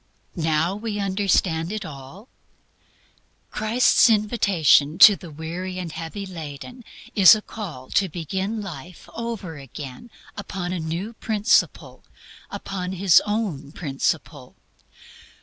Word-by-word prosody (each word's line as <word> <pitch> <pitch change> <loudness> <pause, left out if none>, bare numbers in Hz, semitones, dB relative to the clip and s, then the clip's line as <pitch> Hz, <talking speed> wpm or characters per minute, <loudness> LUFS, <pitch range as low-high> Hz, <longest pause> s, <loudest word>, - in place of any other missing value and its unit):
Now 160 +2 0
we 210 0 -4
understand 190 -4 0
it 215 -2 -4
all? 145 - -11 1.2
Christ's 230 +3 +3
invitation 200 - +3
to 205 +1 +9
the 175 - -11
weary 170 +5 -6
and 175 -3 -5
heavy 165 +5 -6
laden 170 - -9 0.3
is 195 0 +8
a 215 - -5
call 160 - -8
to 195 -2 +2
begin 190 +6 -4
life 175 -2 -10
over 225 -9 -5
again 135 - -9 0.3
upon 185 -3 -5
a 180 - -3
new 170 +8 -4
principle 220 0 0 0.5
upon 185 -1 -5
His 190 -2 +5
own 195 -10 -3
principle. 140 -2 -3
185 Hz, 115 wpm, -23 LUFS, 160-205 Hz, 1.2 s, to